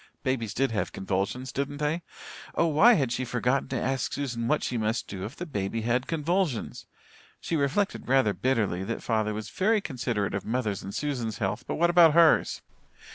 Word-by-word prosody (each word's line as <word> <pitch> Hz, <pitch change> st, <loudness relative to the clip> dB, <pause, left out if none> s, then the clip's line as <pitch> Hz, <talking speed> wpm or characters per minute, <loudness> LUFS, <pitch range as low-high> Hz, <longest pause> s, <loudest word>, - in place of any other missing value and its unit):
Babies 125 Hz, -5 st, -1 dB
did 135 Hz, -1 st, +1 dB
have 110 Hz, -, -1 dB
convulsions, 100 Hz, +7 st, -2 dB
didn't 140 Hz, +3 st, -3 dB
they? 150 Hz, +3 st, -1 dB, 0.5 s
Oh, -, -, +3 dB
why 170 Hz, +10 st, +6 dB
had 135 Hz, -, +1 dB
she 130 Hz, -, -1 dB
forgotten 125 Hz, +2 st, 0 dB
to 130 Hz, -, -1 dB
ask 135 Hz, -1 st, -1 dB
Susan 120 Hz, -5 st, -3 dB
what 150 Hz, +3 st, +1 dB
she 125 Hz, -, -2 dB
must 110 Hz, +1 st, -1 dB
do 95 Hz, -1 st, -5 dB
if 115 Hz, +8 st, -8 dB
the 175 Hz, -, -5 dB
baby 115 Hz, -, -3 dB
had 120 Hz, +3 st, 0 dB
convulsions? 165 Hz, -, -1 dB, 0.5 s
She 165 Hz, -, -3 dB
reflected 155 Hz, +7 st, 0 dB
rather 130 Hz, -5 st, +3 dB
bitterly 105 Hz, -9 st, 0 dB
that 115 Hz, +4 st, -4 dB
father 110 Hz, -2 st, 0 dB
was 105 Hz, 0 st, -6 dB
very 215 Hz, +3 st, +2 dB
considerate 120 Hz, -, -2 dB
of 100 Hz, -, -2 dB
mother's 110 Hz, -4 st, -2 dB
and 95 Hz, -, -7 dB
Susan's 125 Hz, -8 st, -2 dB
health, 95 Hz, 0 st, -2 dB
but -, -, -2 dB
what 170 Hz, +1 st, +3 dB
about 170 Hz, -3 st, +6 dB
hers? 170 Hz, -2 st, +4 dB
125 Hz, 185 wpm, -27 LUFS, 110-150 Hz, 0.5 s, why